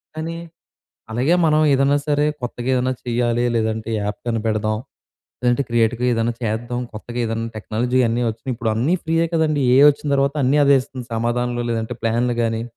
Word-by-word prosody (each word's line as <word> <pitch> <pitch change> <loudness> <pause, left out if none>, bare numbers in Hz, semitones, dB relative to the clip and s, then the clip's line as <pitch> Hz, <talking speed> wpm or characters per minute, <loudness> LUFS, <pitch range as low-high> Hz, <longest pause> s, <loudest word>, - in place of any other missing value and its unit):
కానీ, 165 +1 -4 0.8
అలాగే 125 +9 +2
మనం 155 0 +3
ఏదైనా 140 +1 +3
సరే 145 0 +2 0.2
కొత్తగా 120 0 -4
ఏదైనా 130 +1 +1
చేయాలి, 120 0 0
లేదంటే 110 0 -1
యాప్ 105 0 -3
కనిపెడదాం, 110 -2 0 0.6
లేదంటే 125 +2 +2
క్రియేటి‌గా 120 +1 +1
ఏదైనా 115 +1 0
చేద్దాం, 120 +2 -2
కొత్తగా 120 +3 -7
ఏదన్నా 115 0 -2
టెక్నాలజీ 120 +4 0
అన్నీ 120 +2 0
వచ్చినాయి. 115 +4 -5
ఇప్పుడు 115 -1 -1
అన్నీ 130 +11 +1
ఫ్రీయే 165 +1 +1
కదండీ! 155 -3 +1
ఏ‌ఐ 140 - +7
వచ్చిన 145 +1 -5
తర్వాత 140 +1 +1
అన్నీ 135 +4 +3
అదే 140 0 +6
ఇస్తుంది 130 -1 -9
సమాధాన‌లు, 120 +1 -1
లేదంటే 115 +1 -2
ప్లాన్‌లు 120 +1 0
గానీ, 115 0 -1
120 Hz, 160 wpm, -20 LUFS, 115-135 Hz, 0.8 s, ఏ‌ఐ